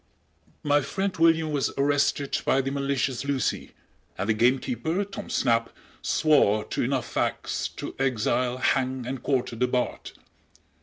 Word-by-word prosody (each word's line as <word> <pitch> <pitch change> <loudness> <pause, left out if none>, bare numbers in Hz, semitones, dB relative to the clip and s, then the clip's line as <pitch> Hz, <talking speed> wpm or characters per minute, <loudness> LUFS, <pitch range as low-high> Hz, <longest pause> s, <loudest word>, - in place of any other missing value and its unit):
My 145 0 +3
friend 190 +6 -2
William 165 -1 +3
was 145 -3 0
arrested 140 0 +1
by 135 - +2
the 135 +1 -3
malicious 135 -2 -1
Lucy, 140 -2 -2 0.4
and 95 - -2
the - - +5
gamekeeper, 125 - +1
Tom 195 - -8
Snap, 115 -2 +1 0.3
swore 110 -9 +3
to - - -1
enough 130 0 0
facts - - -2
to - - -6
exile, 125 -1 0
hang 130 -1 0
and 130 +1 -4
quarter 130 -3 -1
the 125 +2 +1
Bard. 125 0 -2
135 Hz, 140 wpm, -26 LUFS, 125-145 Hz, 0.4 s, the